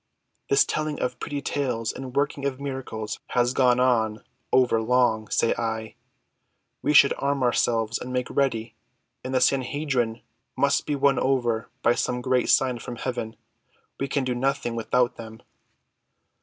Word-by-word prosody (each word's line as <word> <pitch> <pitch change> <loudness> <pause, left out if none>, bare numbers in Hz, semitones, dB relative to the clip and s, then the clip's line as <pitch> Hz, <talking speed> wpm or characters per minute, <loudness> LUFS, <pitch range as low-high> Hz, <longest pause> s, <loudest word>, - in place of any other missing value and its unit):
"This 140 - +5
telling 155 -1 -2
of 125 -1 -2
pretty 145 -1 -4
tales 125 -6 -2
and 130 -1 -8
working 140 0 0
of 130 -1 -4
miracles 130 -6 -5
has 120 0 +1
gone 125 -2 +3
on 115 -4 +1 0.3
over 125 -3 +3
long, 110 -2 +2
say - - +2
I. 110 -1 -3 0.9
We - - +1
should 140 -1 +7
arm 140 -1 0
ourselves 115 -2 +1
and 125 - -6
make 125 0 -1
ready, 115 -5 0 0.5
and 130 - -5
the 130 - +2
Sanhedrim 130 -3 0 0.4
must 140 +1 +2
be 150 - 0
won 140 -1 +3
over 120 -4 0
by 120 - +5
some 125 0 -1
great 130 0 +1
sign 130 -3 +3
from 120 - -7
heaven. 120 -2 -4 0.6
We 135 - -1
can 140 0 -1
do 130 -1 -1
nothing 135 -1 -1
without 120 +2 0
them." 110 -1 -10
125 Hz, 155 wpm, -25 LUFS, 115-135 Hz, 0.9 s, should